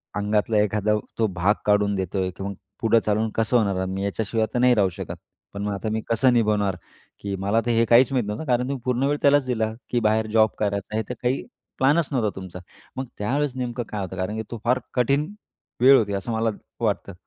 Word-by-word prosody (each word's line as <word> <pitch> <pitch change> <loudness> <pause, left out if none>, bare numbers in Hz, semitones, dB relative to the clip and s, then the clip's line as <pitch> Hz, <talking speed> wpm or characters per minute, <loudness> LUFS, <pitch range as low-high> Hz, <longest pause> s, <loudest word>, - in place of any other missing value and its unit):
अंगातला 105 +1 +1
एखादा 105 0 +2 0.3
तो 110 - +3
भाग 95 +2 +1
काढून 105 -1 +3
देतोय, 95 0 -1
की 95 - -8
मग 100 0 -3 0.3
पुढं 115 0 +4
चालवून 110 +1 +1
कसं 115 +2 +2
होणार? 100 -4 +1
मी 95 +1 -3
याच्याशिवाय 110 +2 -1
आता 120 - -3
नाही 125 -1 +5
राहू 100 -3 +3
शकत. 95 0 -7 0.4
पण 100 - -5
मग 105 -1 -1
आता 110 +2 -3
मी 110 0 -1
कसं 125 +2 +3
निभावणार? 105 -4 +2 0.4
की 100 -1 -4
मला 100 +4 +1
तर 120 - +1
हे 115 0 +3
काहीच 125 +3 +6
माहीत 125 -5 +1
नव्हतं. 105 +10 -4
कारण 125 -2 +2
तुम्ही 140 0 -2
पूर्ण 125 +1 0
वेळ 145 +1 +1
त्यालाच 140 -1 +4
दिला, 110 -3 -1 0.2
की 120 - +1
बाहेर 110 0 +1
जॉब 110 -1 +5
करायचा 100 0 -2
आहे - - +1
हे - - -1
तर - - -2
काही 125 +2 0 0.3
प्लॅनच 145 +4 +3
नव्हता 115 -6 +1
तुमचा. 95 -1 -8 0.4
मग 130 - -2
त्यावेळेस 135 +5 -1
नेमकं 125 -1 -3
काय 105 -2 -4
होतं 95 0 -5
कारण 95 +4 -2
की 110 - -3
तो 115 - -5
फार 125 +2 +2
कठीण 140 - +1 0.5
वेळ 135 +1 +8
होती 100 -2 0
असं 100 +4 -3
मला 110 0 +1 0.3
वाटतं. 100 -3 -1
110 Hz, 220 wpm, -24 LUFS, 100-125 Hz, 0.5 s, वेळ